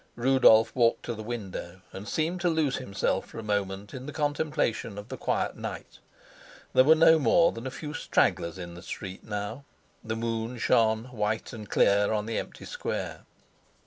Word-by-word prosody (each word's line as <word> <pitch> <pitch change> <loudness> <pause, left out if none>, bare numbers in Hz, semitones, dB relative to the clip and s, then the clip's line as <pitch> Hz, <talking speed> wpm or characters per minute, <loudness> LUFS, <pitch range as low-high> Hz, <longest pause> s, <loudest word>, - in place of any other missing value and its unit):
Rudolf 120 -3 +5
walked 120 -2 +3
to 120 - -3
the 110 - -7
window 95 -5 -6
and 100 +2 -8
seemed 165 - -1
to 175 - +2
lose 160 -5 +1
himself 115 -7 -1
for - - -12
a 115 - -5
moment 100 -1 -2
in 130 +2 -7
the - - -4
contemplation 145 -8 -1
of 105 - -8
the - - -4
quiet - - -1
night. - - -7 0.7
There 130 - +7
were 155 +4 +7
no 160 0 +6
more 160 +6 +4
than 115 +3 -6
a - - -2
few 150 +3 -7
stragglers 85 - +1
in 85 -1 -7
the 85 - -10
street 95 -1 -7
now; 105 +5 -5 0.4
the 110 0 -3
moon 115 +1 -3
shone 110 0 +2
white 110 -2 -2
and 110 -3 -8
clear 100 0 +3
on 105 -1 -1
the 115 0 -1
empty - - -8
square. - - -4
115 Hz, 180 wpm, -28 LUFS, 105-135 Hz, 0.7 s, There